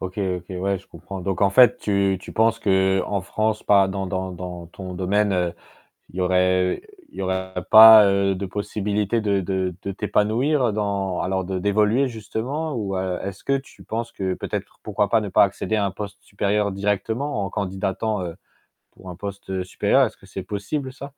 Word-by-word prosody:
OK, 95 Hz, +2 st, -6 dB, 0.2 s
OK, 90 Hz, -1 st, -10 dB
ouais, 95 Hz, +1 st, -1 dB
je 100 Hz, -, -20 dB
comprends. 100 Hz, -1 st, -9 dB
Donc 95 Hz, +2 st, -2 dB
en 100 Hz, -, +4 dB
fait, 125 Hz, +4 st, +6 dB
tu 100 Hz, -2 st, +1 dB
tu -, -, -11 dB
penses 115 Hz, 0 st, +2 dB
qu'en 95 Hz, -1 st, +1 dB
France, 110 Hz, +3 st, -1 dB
pas 100 Hz, -2 st, +5 dB
dans 95 Hz, 0 st, -3 dB
dans 95 Hz, 0 st, -3 dB
dans 90 Hz, -1 st, -7 dB
ton 90 Hz, +1 st, -8 dB
domaine, 100 Hz, +3 st, +1 dB
heu, 90 Hz, -2 st, 0 dB, 0.6 s
il -, -, -21 dB
y -, -, 0 dB
aurait 90 Hz, 0 st, +2 dB, 0.3 s
il -, -, -14 dB
y -, -, -2 dB
aura 95 Hz, 0 st, -2 dB, 0.2 s
pas, 110 Hz, -1 st, +11 dB
heu, 100 Hz, -1 st, +2 dB
de 100 Hz, +1 st, -4 dB
possibilité 105 Hz, +2 st, -1 dB
de 100 Hz, -2 st, +1 dB
de 95 Hz, -1 st, -2 dB
de 100 Hz, -, -4 dB
t'épanouir 115 Hz, +6 st, +1 dB
dans 100 Hz, -3 st, -2 dB
alors 95 Hz, 0 st, -1 dB
de 95 Hz, +1 st, -3 dB
d'évoluer 105 Hz, +7 st, +2 dB
justement 125 Hz, +7 st, -4 dB
ou 100 Hz, -4 st, -3 dB
a 95 Hz, -1 st, -2 dB
est-ce 100 Hz, -1 st, -7 dB
que 140 Hz, -, +1 dB
tu 135 Hz, -, -14 dB
penses 115 Hz, +1 st, -4 dB
que 95 Hz, -1 st, -2 dB
peut-être -, -, -4 dB
pour -, -, -30 dB
pourquoi 105 Hz, -1 st, 0 dB
pas -, -, +4 dB
ne 105 Hz, -2 st, -5 dB
pas -, -, +5 dB
accéder 100 Hz, +2 st, 0 dB
à 105 Hz, -2 st, +1 dB
un 100 Hz, -, 0 dB
poste 100 Hz, +1 st, -7 dB
supérieur 100 Hz, +1 st, 0 dB
directement 105 Hz, +5 st, -2 dB
en 95 Hz, -, -4 dB
candidatant, 95 Hz, +1 st, -2 dB
heu, 85 Hz, -2 st, -6 dB, 0.6 s
pour 95 Hz, -, -13 dB
un 90 Hz, -, -7 dB
poste 95 Hz, 0 st, -5 dB
supérieur? 90 Hz, -, +2 dB
Est-ce -, -, -6 dB
que -, -, -18 dB
c'est 95 Hz, -, -6 dB
possible 130 Hz, +8 st, -4 dB
ça? 135 Hz, +1 st, -8 dB
100 Hz, 200 wpm, -23 LUFS, 95-110 Hz, 0.6 s, pas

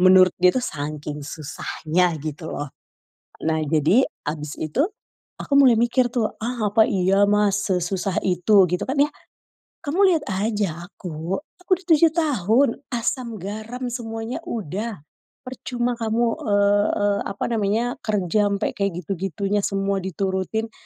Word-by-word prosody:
Menurut 185 Hz, 0 st, +7 dB
dia 180 Hz, -, +6 dB
tuh 250 Hz, -, 0 dB
sangking 150 Hz, 0 st, -5 dB
susahnya 160 Hz, +3 st, -1 dB
gitu 155 Hz, +2 st, -6 dB
loh. 145 Hz, -2 st, -5 dB, 0.7 s
Nah, 160 Hz, -1 st, +1 dB
jadi 155 Hz, -, +3 dB, 0.2 s
abis 150 Hz, 0 st, -4 dB
itu, 160 Hz, -, 0 dB, 0.5 s
aku -, -, -9 dB
mulai 260 Hz, -4 st, +7 dB
mikir 240 Hz, +2 st, +3 dB
tuh, 235 Hz, -3 st, 0 dB
"Ah, 225 Hz, -2 st, -1 dB
apa 220 Hz, +1 st, +5 dB
iya 195 Hz, +2 st, +3 dB
Mas 205 Hz, 0 st, +2 dB
sesusah 185 Hz, +1 st, -1 dB
itu?" 190 Hz, +2 st, +4 dB
Gitu 180 Hz, -, -1 dB
kan 265 Hz, -, -1 dB
ya, 290 Hz, +1 st, +3 dB, 0.7 s
"Kamu 315 Hz, +7 st, 0 dB
liat 310 Hz, -, -1 dB
aja 190 Hz, -4 st, -1 dB
aku, 170 Hz, -1 st, -5 dB, 0.2 s
aku 360 Hz, -, -24 dB
dah 370 Hz, -, -19 dB
7 320 Hz, +1 st, +7 dB
tahun, 270 Hz, -, +3 dB, 0.2 s
asam 240 Hz, -1 st, -2 dB
garam 220 Hz, +6 st, -6 dB
semuanya 225 Hz, 0 st, -4 dB
udah, 210 Hz, -2 st, -4 dB, 0.4 s
percuma 245 Hz, -1 st, -3 dB
kamu, 225 Hz, +1 st, +1 dB, 0.2 s
eee 205 Hz, 0 st, +3 dB, 0.2 s
eee, 205 Hz, 0 st, +2 dB
apa 200 Hz, -, -5 dB
namanya, 215 Hz, 0 st, +1 dB, 0.2 s
kerja 210 Hz, 0 st, +1 dB
ampe 200 Hz, -1 st, -1 dB
kek 200 Hz, -3 st, -2 dB
gitu-gitunya, 195 Hz, +3 st, -2 dB
semua 195 Hz, 0 st, 0 dB
diturutin. 190 Hz, +4 st, -2 dB
200 Hz, 140 wpm, -23 LUFS, 180-230 Hz, 0.7 s, Menurut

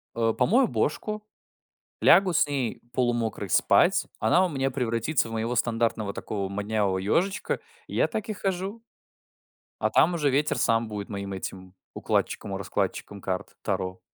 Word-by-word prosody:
э, 115 Hz, -1 st, +2 dB
помою 245 Hz, +5 st, +4 dB
бошку, 215 Hz, 0 st, -1 dB, 0.8 s
лягу 190 Hz, -2 st, +6 dB
с -, -, +4 dB
ней 135 Hz, -5 st, -2 dB
полумокрой 120 Hz, -5 st, 0 dB
спать, -, -, +4 dB
она 170 Hz, +12 st, +4 dB
у 185 Hz, -, +1 dB
меня 135 Hz, -2 st, 0 dB
превратится 125 Hz, +1 st, 0 dB
в -, -, -8 dB
моего 115 Hz, +2 st, -1 dB
стандартного 115 Hz, -3 st, 0 dB
такого 100 Hz, -2 st, -4 dB
моднявого 100 Hz, -1 st, 0 dB
ежичка, 180 Hz, -, 0 dB, 0.3 s
и -, -, -9 dB
я -, -, +3 dB
так 215 Hz, +1 st, -4 dB
и -, -, -1 dB
хожу. 195 Hz, +3 st, -3 dB, 1.0 s
А -, -, +1 dB
там 175 Hz, -, +4 dB
уже 150 Hz, -4 st, +1 dB
ветер 145 Hz, +3 st, +1 dB
сам 115 Hz, 0 st, +2 dB
будет 105 Hz, -2 st, -5 dB
моим 100 Hz, -2 st, -5 dB
этим 95 Hz, -1 st, -7 dB, 0.2 s
укладчиком 100 Hz, -, -1 dB
и -, -, -3 dB
раскладчиком 100 Hz, +1 st, -3 dB
карт 95 Hz, -1 st, -4 dB
Таро. 95 Hz, 0 st, -2 dB
115 Hz, 155 wpm, -26 LUFS, 100-160 Hz, 1.0 s, лягу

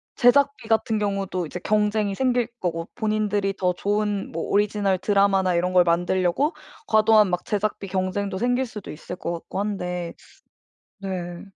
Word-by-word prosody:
제작비 280 Hz, 0 st, +3 dB
같은 225 Hz, 0 st, +1 dB
경우도 195 Hz, -3 st, -2 dB
이제 180 Hz, +4 st, -6 dB
경쟁이 210 Hz, -1 st, +1 dB
생길 250 Hz, -1 st, +1 dB
거고 165 Hz, -2 st, -2 dB
본인들이 210 Hz, -3 st, 0 dB
더 180 Hz, -1 st, +1 dB
좋은 205 Hz, +1 st, -1 dB
뭐 165 Hz, -, -3 dB
오리지널 205 Hz, -2 st, +2 dB
드라마나 195 Hz, -2 st, +2 dB
이런 180 Hz, +2 st, +1 dB
걸 180 Hz, -1 st, +6 dB
만들려고 180 Hz, -, +1 dB, 0.3 s
과도한 215 Hz, -2 st, +5 dB
막 180 Hz, 0 st, -2 dB
제작비 205 Hz, -1 st, -2 dB
경쟁도 190 Hz, +1 st, -2 dB
생길 245 Hz, +4 st, +1 dB
수도 210 Hz, -4 st, -8 dB
있을 165 Hz, +3 st, -8 dB
것 170 Hz, -, -4 dB
같고 170 Hz, +3 st, -6 dB
한데 180 Hz, -4 st, -3 dB, 0.9 s
네. 175 Hz, -3 st, -5 dB
200 Hz, 320 characters per minute, -24 LUFS, 180-215 Hz, 0.9 s, 걸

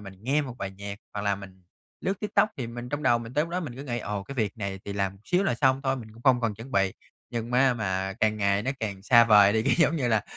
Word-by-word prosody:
mình 95 Hz, -2 st, -10 dB
nghe 140 Hz, +6 st, +1 dB
một 130 Hz, -4 st, -7 dB
bài 95 Hz, -, -4 dB
nhạc 100 Hz, +1 st, -8 dB, 0.2 s
hoặc 100 Hz, -, -3 dB
là 100 Hz, -1 st, +1 dB
mình 95 Hz, -2 st, -12 dB, 0.4 s
lướt 195 Hz, 0 st, -2 dB
TikTok 210 Hz, 0 st, +2 dB
thì 125 Hz, -, -4 dB
mình 120 Hz, +1 st, -7 dB
trong 145 Hz, +3 st, -3 dB
đầu 120 Hz, -4 st, +4 dB
mình 120 Hz, +2 st, -9 dB
tới 150 Hz, -, +2 dB
lúc 165 Hz, -, -10 dB
đó 180 Hz, +1 st, -1 dB
mình 140 Hz, -8 st, -6 dB
cứ 135 Hz, -, -6 dB
nghĩ: 120 Hz, -3 st, -2 dB
"Ồ, 105 Hz, -3 st, -4 dB
cái 140 Hz, +8 st, -9 dB
việc 110 Hz, -2 st, -1 dB
này 100 Hz, -2 st, -4 dB
thì 100 Hz, -, -5 dB
làm 100 Hz, -1 st, -2 dB
xíu 180 Hz, +2 st, +2 dB
là 195 Hz, -, +1 dB
xong 130 Hz, +2 st, +2 dB
thôi, 135 Hz, -1 st, 0 dB
mình 110 Hz, -3 st, -9 dB
cũng 115 Hz, -, -16 dB
không 130 Hz, -1 st, +4 dB
cần 115 Hz, -3 st, 0 dB
chuẩn 115 Hz, +6 st, -11 dB
bị." 95 Hz, -1 st, +2 dB, 0.4 s
Nhưng 115 Hz, 0 st, -4 dB
ma 125 Hz, 0 st, +4 dB
mà 95 Hz, -3 st, -2 dB
càng 110 Hz, 0 st, +2 dB
ngày 100 Hz, 0 st, +1 dB
nó 130 Hz, -, -1 dB
càng 100 Hz, -3 st, -4 dB
xa 115 Hz, +1 st, +6 dB
vời 105 Hz, -2 st, +6 dB
đi, 110 Hz, 0 st, +2 dB
cái 135 Hz, -, +2 dB
giống 165 Hz, 0 st, +4 dB
như 125 Hz, -5 st, 0 dB
là 110 Hz, -2 st, +2 dB
115 Hz, 295 wpm, -27 LUFS, 100-130 Hz, 0.4 s, xa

